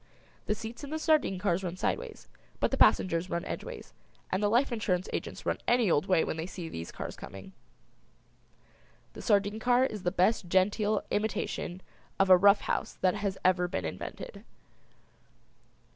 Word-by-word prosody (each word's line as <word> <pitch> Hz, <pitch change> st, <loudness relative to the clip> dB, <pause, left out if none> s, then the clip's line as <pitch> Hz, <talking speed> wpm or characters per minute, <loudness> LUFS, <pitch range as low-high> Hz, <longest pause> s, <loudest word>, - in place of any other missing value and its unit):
The 210 Hz, -, +1 dB
seats 225 Hz, +4 st, -8 dB
in 285 Hz, -, -6 dB
the 315 Hz, -, -2 dB
sardine 310 Hz, -, +2 dB
cars 185 Hz, -1 st, 0 dB
run 180 Hz, 0 st, -4 dB
sideways; -, -, -3 dB, 0.3 s
the -, -, +1 dB
passengers 175 Hz, 0 st, +3 dB
run 170 Hz, -, -2 dB
edgeways, -, -, -7 dB, 0.4 s
and 185 Hz, -, 0 dB
the 205 Hz, -, +2 dB
life 245 Hz, +5 st, +3 dB
insurance 190 Hz, -5 st, -1 dB
agents -, -, -5 dB
run -, -, 0 dB
any 240 Hz, -6 st, +3 dB
old 150 Hz, +5 st, +2 dB
way 185 Hz, -4 st, +4 dB
when -, -, -3 dB
they 160 Hz, +2 st, -3 dB
see 180 Hz, -3 st, -7 dB
these 85 Hz, -, -6 dB
cars -, -, -6 dB
coming. 95 Hz, -, -10 dB, 1.6 s
The -, -, -9 dB
sardine 205 Hz, 0 st, +2 dB
car 245 Hz, +2 st, +3 dB
is 215 Hz, -6 st, -4 dB
the 175 Hz, -, +1 dB
best 185 Hz, +1 st, +2 dB
genteel 205 Hz, +3 st, +2 dB
imitation 205 Hz, -3 st, -2 dB, 0.4 s
of 195 Hz, -1 st, +4 dB
a -, -, +11 dB
rough 200 Hz, +3 st, +5 dB
house -, -, -2 dB
that 185 Hz, -1 st, +3 dB
has 200 Hz, -2 st, -2 dB
ever 180 Hz, -1 st, +3 dB
been 95 Hz, -, -3 dB
invented. 80 Hz, -, -7 dB
195 Hz, 165 wpm, -30 LUFS, 180-220 Hz, 1.6 s, a